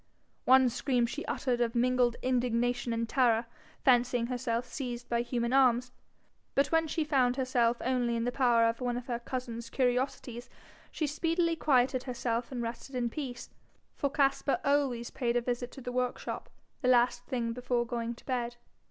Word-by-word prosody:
One 260 Hz, 0 st, +6 dB
scream 245 Hz, 0 st, +1 dB
she 290 Hz, +6 st, -4 dB
uttered 245 Hz, -3 st, -1 dB
of 235 Hz, 0 st, 0 dB
mingled 245 Hz, 0 st, +2 dB
indignation 245 Hz, -1 st, 0 dB
and 230 Hz, 0 st, -1 dB
terror, 235 Hz, -2 st, +3 dB, 0.4 s
fancying 245 Hz, -2 st, +4 dB
herself 245 Hz, -1 st, -2 dB
seized 245 Hz, -1 st, -5 dB
by 235 Hz, 0 st, +1 dB
human 240 Hz, 0 st, -1 dB
arms; 250 Hz, -2 st, +4 dB, 0.6 s
but 275 Hz, +1 st, +2 dB
when 325 Hz, 0 st, +3 dB
she 315 Hz, +1 st, -1 dB
found 260 Hz, -5 st, +2 dB
herself 245 Hz, -3 st, +1 dB
only 245 Hz, -2 st, +1 dB
in 230 Hz, -, -1 dB
the 245 Hz, -, 0 dB
power 240 Hz, -3 st, +3 dB
of 230 Hz, +2 st, -2 dB
one 245 Hz, -1 st, -1 dB
of 245 Hz, -, -6 dB
her 240 Hz, -3 st, -3 dB
cousin's 235 Hz, -2 st, -5 dB
curiosities, 250 Hz, -1 st, -1 dB, 0.4 s
she 310 Hz, -, -2 dB
speedily 330 Hz, +3 st, 0 dB
quieted 260 Hz, -4 st, +2 dB
herself 240 Hz, -1 st, -2 dB
and 245 Hz, -2 st, -3 dB
rested 235 Hz, +3 st, -6 dB
in 240 Hz, -2 st, -1 dB
peace, 250 Hz, -4 st, -6 dB, 0.4 s
for 280 Hz, -, 0 dB
Caspar 275 Hz, -1 st, +1 dB
always 275 Hz, -4 st, +1 dB
paid 245 Hz, -3 st, -1 dB
a 245 Hz, -, +3 dB
visit 245 Hz, 0 st, -3 dB
to 270 Hz, -, -10 dB
the 245 Hz, -, -5 dB
workshop 250 Hz, 0 st, -3 dB, 0.3 s
the 255 Hz, -, 0 dB
last 245 Hz, -1 st, +3 dB
thing 235 Hz, -3 st, -1 dB
before 245 Hz, 0 st, -1 dB
going 235 Hz, -1 st, -3 dB
to -, -, -18 dB
bed. 240 Hz, -2 st, -2 dB
245 Hz, 170 wpm, -30 LUFS, 235-260 Hz, 0.6 s, One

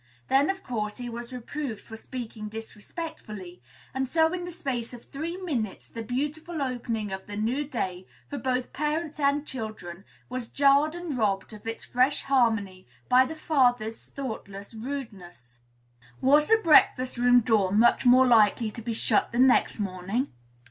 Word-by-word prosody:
Then, 275 Hz, +4 st, +4 dB
of 385 Hz, 0 st, -2 dB
course, 210 Hz, -4 st, -3 dB
he 245 Hz, -1 st, -5 dB
was 235 Hz, +1 st, -7 dB
reproved 250 Hz, -1 st, -5 dB
for 225 Hz, -, -11 dB
speaking 225 Hz, -2 st, -7 dB
disrespectfully; 215 Hz, -, -8 dB, 0.3 s
and 265 Hz, +1 st, -1 dB
so 320 Hz, +4 st, +3 dB
in 355 Hz, -1 st, -3 dB
the 355 Hz, -, -6 dB
space 250 Hz, -7 st, -3 dB
of 235 Hz, -, -14 dB
three 325 Hz, +5 st, -5 dB
minutes 265 Hz, -, -3 dB
the 230 Hz, -, -6 dB
beautiful 295 Hz, +8 st, -3 dB
opening 235 Hz, -6 st, -2 dB
of 190 Hz, 0 st, -6 dB
the 205 Hz, 0 st, -6 dB
new 240 Hz, +7 st, 0 dB
day, 190 Hz, -9 st, -4 dB, 0.2 s
for 285 Hz, -, -5 dB
both 255 Hz, -1 st, -1 dB
parents 305 Hz, +1 st, -2 dB
and 285 Hz, +1 st, +2 dB
children, 215 Hz, -, -7 dB, 0.2 s
was 250 Hz, -2 st, -5 dB
jarred 285 Hz, +3 st, +4 dB
and 345 Hz, -5 st, -4 dB
robbed 200 Hz, -1 st, 0 dB
of 215 Hz, +1 st, -11 dB
its 225 Hz, -, -4 dB
fresh 255 Hz, +4 st, +2 dB
harmony 220 Hz, -, +1 dB, 0.2 s
by 255 Hz, +1 st, +6 dB
the 320 Hz, -, -6 dB
father's 245 Hz, -8 st, +1 dB
thoughtless 220 Hz, -6 st, -7 dB
rudeness. 200 Hz, -, -8 dB, 0.6 s
Was 295 Hz, +3 st, +5 dB
the 445 Hz, 0 st, +5 dB
breakfast 265 Hz, -5 st, +5 dB
room 245 Hz, 0 st, +5 dB
door 215 Hz, -5 st, +2 dB
much 220 Hz, +4 st, +4 dB
more 255 Hz, +1 st, +7 dB
likely 220 Hz, -2 st, +4 dB
to 230 Hz, -, -8 dB
be 230 Hz, +1 st, -3 dB
shut 225 Hz, -, +1 dB
the 235 Hz, -, -3 dB
next 255 Hz, -2 st, +4 dB
morning? 195 Hz, +6 st, -2 dB
245 Hz, 160 wpm, -27 LUFS, 215-280 Hz, 0.6 s, more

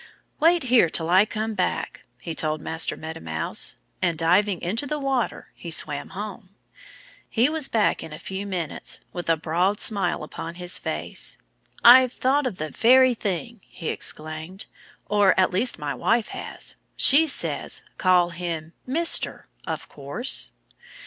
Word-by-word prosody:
"Wait 335 Hz, +1 st, +4 dB
here 245 Hz, -9 st, +4 dB
till 165 Hz, +1 st, -1 dB
I 190 Hz, +3 st, +6 dB
come 220 Hz, 0 st, -3 dB
back!" 185 Hz, -3 st, -2 dB, 0.2 s
he 165 Hz, -, -6 dB
told 155 Hz, -1 st, -1 dB
Master 160 Hz, +2 st, 0 dB
Meadow 160 Hz, +1 st, -7 dB
Mouse. 80 Hz, 0 st, -2 dB, 0.3 s
And, 170 Hz, -2 st, 0 dB
diving 180 Hz, +3 st, +2 dB
into 225 Hz, +11 st, -3 dB
the 300 Hz, -, -2 dB
water, 270 Hz, -4 st, -2 dB
he 170 Hz, -, -9 dB
swam 150 Hz, -3 st, 0 dB
home. 200 Hz, -1 st, -7 dB, 0.7 s
He 245 Hz, +4 st, +2 dB
was 310 Hz, -3 st, -1 dB
back 220 Hz, -2 st, +1 dB
in 160 Hz, -, -8 dB
a 155 Hz, -, -7 dB
few 190 Hz, +4 st, -6 dB
minutes, 175 Hz, -6 st, -3 dB
with 175 Hz, -2 st, -5 dB
a 165 Hz, -, +3 dB
broad 175 Hz, +6 st, 0 dB
smile 200 Hz, -7 st, +2 dB
upon 165 Hz, +2 st, -7 dB
his 180 Hz, 0 st, -1 dB
face. -, -, -2 dB, 0.5 s
"I've 255 Hz, +1 st, +8 dB
thought 270 Hz, +2 st, +1 dB
of 195 Hz, -, -5 dB
the 155 Hz, 0 st, -5 dB
very 255 Hz, +2 st, +5 dB
thing!" 210 Hz, +1 st, -4 dB
he 165 Hz, -, -7 dB
exclaimed. 155 Hz, +5 st, -4 dB, 0.4 s
"Or, 205 Hz, -2 st, +3 dB
at 185 Hz, -, +3 dB
least, 215 Hz, +7 st, +2 dB
my 145 Hz, -1 st, -3 dB
wife 225 Hz, -, 0 dB
has. -, -, -6 dB, 0.2 s
She 310 Hz, +4 st, +6 dB
says, 280 Hz, -, +1 dB, 0.2 s
'Call 180 Hz, -2 st, +3 dB
him 170 Hz, -2 st, -5 dB
"Mister," 330 Hz, +6 st, +1 dB, 0.2 s
of -, -, -4 dB
course'!" 145 Hz, -, -2 dB
190 Hz, 155 wpm, -24 LUFS, 165-235 Hz, 0.7 s, I've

